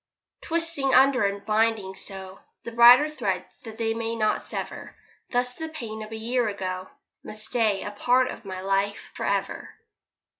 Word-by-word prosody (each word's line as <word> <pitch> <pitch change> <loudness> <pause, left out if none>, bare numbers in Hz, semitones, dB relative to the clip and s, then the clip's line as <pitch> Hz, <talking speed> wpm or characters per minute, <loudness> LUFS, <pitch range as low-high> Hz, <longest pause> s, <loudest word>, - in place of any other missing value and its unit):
Twisting 330 -5 0
under 260 -3 +5
and 200 0 -2
binding 215 -2 +1
so 190 0 -6 0.2
The 235 - -6
brighter 240 +5 +8
threads 195 -12 -2 0.2
that 220 -1 -9
they 225 -1 0
may 230 0 -3
not 215 -1 +1
sever. - - -6 0.3
Thus 245 0 +1
the 320 +4 -6
pain 230 -8 -7
of 215 0 -8
a - - -5
year 240 +2 0
ago 185 -2 -4 0.3
Must 215 0 -5
stay 220 -5 +1
a 205 - -5
part 245 +5 +2
of - - -10
my 190 -2 -6
life 195 +1 -1
for - - -4
ever. - - -2
225 Hz, 165 wpm, -26 LUFS, 200-250 Hz, 0.3 s, brighter